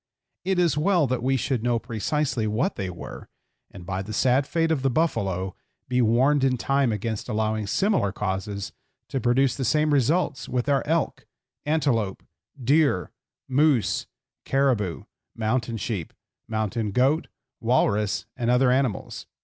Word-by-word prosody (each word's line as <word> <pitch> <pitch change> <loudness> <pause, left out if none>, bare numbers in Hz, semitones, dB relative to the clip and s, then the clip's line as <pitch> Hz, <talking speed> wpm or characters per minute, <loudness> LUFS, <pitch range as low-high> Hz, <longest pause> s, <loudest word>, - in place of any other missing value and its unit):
It 190 0 0
is 165 -5 +2
well 175 -1 +3
that 130 -2 -1
we 135 +2 +1
should 130 -2 -1
know 120 0 +1
precisely 115 +1 -1
what 115 - 0
they 95 -2 -3
were, 90 - -9 0.4
and 90 - -11
by 95 0 -3
the 110 +3 -7
sad 130 +4 +2
fate 165 -1 +1
of 155 -4 +1
the 135 - +2
buffalo 100 - -1 0.3
be 125 0 +1
warned 130 +5 +3
in 130 -1 +2
time 135 +3 +1
against 110 +2 -3
allowing 110 -1 -1
similar 190 - +1
causes 100 0 -3 0.4
to 135 -3 -2
produce 125 +2 +2
the 135 - -3
same 150 +5 +2
results 145 -2 +1
with 125 +1 -1
our 140 -1 +3
elk, 165 0 -1 0.4
antelope, 125 -11 0 0.4
deer, 135 - +2 0.4
moose, 135 -3 +2 0.4
caribou, 125 -10 +1 0.3
mountain 115 +1 -1
sheep, 100 -8 -4 0.3
mountain 110 0 -1
goat, 135 - +2 0.3
walrus, 105 -4 +1
and 120 -2 -1
other 125 +1 +4
animals. 130 -6 -1
125 Hz, 145 wpm, -25 LUFS, 110-140 Hz, 0.4 s, other